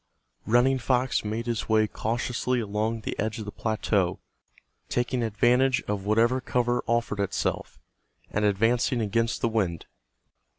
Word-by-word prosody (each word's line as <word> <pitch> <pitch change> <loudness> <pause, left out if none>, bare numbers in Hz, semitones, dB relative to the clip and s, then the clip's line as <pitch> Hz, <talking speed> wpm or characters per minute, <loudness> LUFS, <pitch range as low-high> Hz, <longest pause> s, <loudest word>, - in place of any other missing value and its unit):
Running 125 +4 +3
Fox 125 0 +1
made 110 +2 -3
his 115 -2 -3
way 110 0 +4
cautiously 120 +3 -1
along 110 +1 -2
the - - -3
edge 110 +2 -1
of 110 - -6
the 105 - -6
plateau, 105 -5 0 0.7
taking 125 0 0
advantage 120 +4 +2
of 100 -2 -3
whatever 115 +4 +3
cover 120 -1 0
offered 115 -3 0
itself, 100 -2 -2 0.5
and 100 - 0
advancing 115 +5 +2
against 115 +2 0
the - - +2
wind. 95 -8 -1
115 Hz, 135 wpm, -26 LUFS, 105-120 Hz, 0.7 s, way